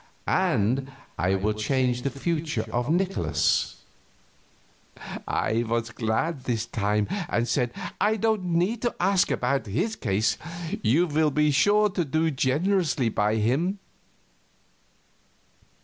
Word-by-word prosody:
And 130 Hz, +7 st, +1 dB, 0.2 s
I 95 Hz, +2 st, +1 dB
will 105 Hz, +3 st, 0 dB
change 125 Hz, +3 st, 0 dB
the 140 Hz, -, -1 dB
future 150 Hz, -3 st, -2 dB
of 120 Hz, +3 st, -1 dB
Nikolaus." 165 Hz, -, +1 dB, 1.5 s
I 115 Hz, +2 st, 0 dB
was 115 Hz, 0 st, -1 dB
glad, 125 Hz, +6 st, -2 dB
this 115 Hz, -3 st, -1 dB
time, 105 Hz, -2 st, 0 dB, 0.2 s
and 120 Hz, +1 st, 0 dB
said, 125 Hz, -3 st, 0 dB, 0.4 s
"I 220 Hz, -, +1 dB
don't 220 Hz, -3 st, 0 dB
need 180 Hz, +6 st, 0 dB
to 240 Hz, -, -1 dB
ask 190 Hz, +1 st, +3 dB
about 135 Hz, 0 st, 0 dB
his 175 Hz, -, -1 dB
case; 105 Hz, 0 st, 0 dB, 0.4 s
you 140 Hz, +11 st, +3 dB
will 155 Hz, -1 st, +2 dB
be 150 Hz, +1 st, +2 dB
sure 205 Hz, +8 st, +4 dB
to 180 Hz, -2 st, -1 dB
do 160 Hz, +2 st, 0 dB
generously 150 Hz, -, +1 dB
by 105 Hz, 0 st, +1 dB
him." 135 Hz, -, +1 dB
135 Hz, 120 wpm, -26 LUFS, 115-175 Hz, 1.5 s, sure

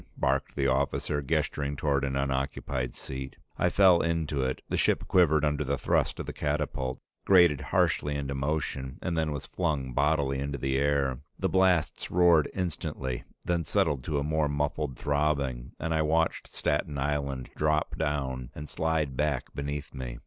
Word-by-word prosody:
barked 70 Hz, +1 st, 0 dB
the 70 Hz, -, 0 dB
officer, 70 Hz, +2 st, 0 dB
gesturing 70 Hz, +1 st, -1 dB
toward 70 Hz, -1 st, 0 dB
an 65 Hz, -1 st, -1 dB
unoccupied 65 Hz, -2 st, -2 dB
seat. 65 Hz, 0 st, -7 dB, 0.2 s
I -, -, +3 dB
fell 95 Hz, -3 st, +6 dB
into 80 Hz, -4 st, 0 dB
it; 65 Hz, 0 st, -2 dB
the -, -, -2 dB
ship -, -, +1 dB
quivered 80 Hz, -4 st, +4 dB
under 75 Hz, 0 st, 0 dB
the 70 Hz, 0 st, -1 dB
thrust -, -, +1 dB
of -, -, -3 dB
the -, -, -5 dB
catapult, 70 Hz, -3 st, -2 dB, 0.2 s
grated 85 Hz, -7 st, +5 dB
harshly 75 Hz, +2 st, +1 dB
into 70 Hz, -1 st, -2 dB
motion, 70 Hz, -1 st, -2 dB
and 90 Hz, -2 st, -1 dB
then 80 Hz, -1 st, 0 dB
was 70 Hz, -2 st, -4 dB
flung 75 Hz, -8 st, -2 dB
bodily 70 Hz, -1 st, +1 dB
into 70 Hz, +1 st, -3 dB
the 65 Hz, +1 st, -1 dB
air. 70 Hz, -2 st, +1 dB, 0.2 s
The 95 Hz, -, 0 dB
blasts 90 Hz, -4 st, +2 dB
roared 85 Hz, -4 st, +5 dB
instantly, 75 Hz, -8 st, -3 dB, 0.2 s
then 85 Hz, -1 st, +1 dB
settled 70 Hz, -2 st, +1 dB
to 75 Hz, -, -1 dB
a 70 Hz, -, 0 dB
more 75 Hz, 0 st, +1 dB
muffled 75 Hz, -1 st, -2 dB
throbbing, 70 Hz, -4 st, 0 dB
and 80 Hz, +1 st, -1 dB
I 80 Hz, -, +2 dB
watched 80 Hz, +2 st, +1 dB
Staten 75 Hz, 0 st, -1 dB
Island 70 Hz, -2 st, -2 dB
drop 75 Hz, 0 st, +1 dB
down 65 Hz, -4 st, -2 dB
and 75 Hz, +1 st, -7 dB
slide 80 Hz, -5 st, -1 dB
back 75 Hz, -2 st, -1 dB
beneath 70 Hz, +1 st, -4 dB
me. 60 Hz, -3 st, -6 dB
70 Hz, 165 wpm, -28 LUFS, 70-75 Hz, 0.2 s, fell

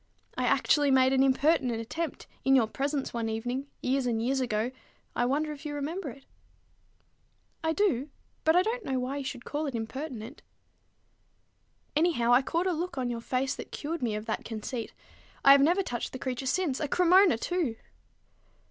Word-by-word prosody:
I -, -, -1 dB
actually 290 Hz, -2 st, +3 dB
made 260 Hz, 0 st, +5 dB
an 265 Hz, -, +4 dB
impertinent 265 Hz, -3 st, +3 dB
attempt 305 Hz, +7 st, -4 dB, 0.2 s
in 270 Hz, 0 st, +5 dB
your 250 Hz, -4 st, +5 dB
presence 275 Hz, +5 st, -2 dB
one 230 Hz, -1 st, -2 dB
evening, 245 Hz, +5 st, -3 dB, 0.2 s
years 260 Hz, 0 st, +1 dB
and 230 Hz, -2 st, 0 dB
years 260 Hz, +4 st, 0 dB
ago, 235 Hz, -1 st, 0 dB, 0.4 s
I 240 Hz, -, +2 dB
wonder 300 Hz, +4 st, 0 dB
if 295 Hz, -1 st, -9 dB
you 295 Hz, -1 st, -4 dB
remember 305 Hz, +3 st, -3 dB
it." 270 Hz, +2 st, -12 dB, 1.4 s
"I 320 Hz, 0 st, +1 dB
do; 305 Hz, -, +1 dB, 0.3 s
but 320 Hz, +1 st, +4 dB
I 360 Hz, -, +5 dB
don't 460 Hz, +3 st, -2 dB
know 265 Hz, -6 st, -1 dB
why 255 Hz, +2 st, -2 dB
you 280 Hz, -, -3 dB
should 255 Hz, -2 st, -6 dB
call 295 Hz, +1 st, -2 dB
it 270 Hz, -, -4 dB
impertinent." 245 Hz, +2 st, -6 dB, 1.5 s
"Anyhow, 300 Hz, -7 st, +3 dB
I 250 Hz, -, +6 dB
caught 335 Hz, +6 st, -1 dB
a 375 Hz, -, +2 dB
look 340 Hz, -1 st, -3 dB
on 250 Hz, -2 st, -1 dB
your 230 Hz, -1 st, -4 dB
face 255 Hz, +2 st, -1 dB
that -, -, -8 dB
cured 315 Hz, +1 st, -4 dB
me 230 Hz, -4 st, 0 dB
of 210 Hz, +1 st, -5 dB
that 220 Hz, -, -3 dB
conceit. 225 Hz, +1 st, -5 dB, 0.5 s
I 275 Hz, -, +10 dB
have 280 Hz, 0 st, +8 dB
never 350 Hz, +7 st, +3 dB
touched 240 Hz, -9 st, -4 dB
the -, -, -4 dB
creature 260 Hz, 0 st, -3 dB
since, 305 Hz, -2 st, 0 dB
a 300 Hz, -, -1 dB
Cremona 360 Hz, -, +5 dB
too!" 320 Hz, -2 st, -1 dB
270 Hz, 185 wpm, -29 LUFS, 245-315 Hz, 1.5 s, I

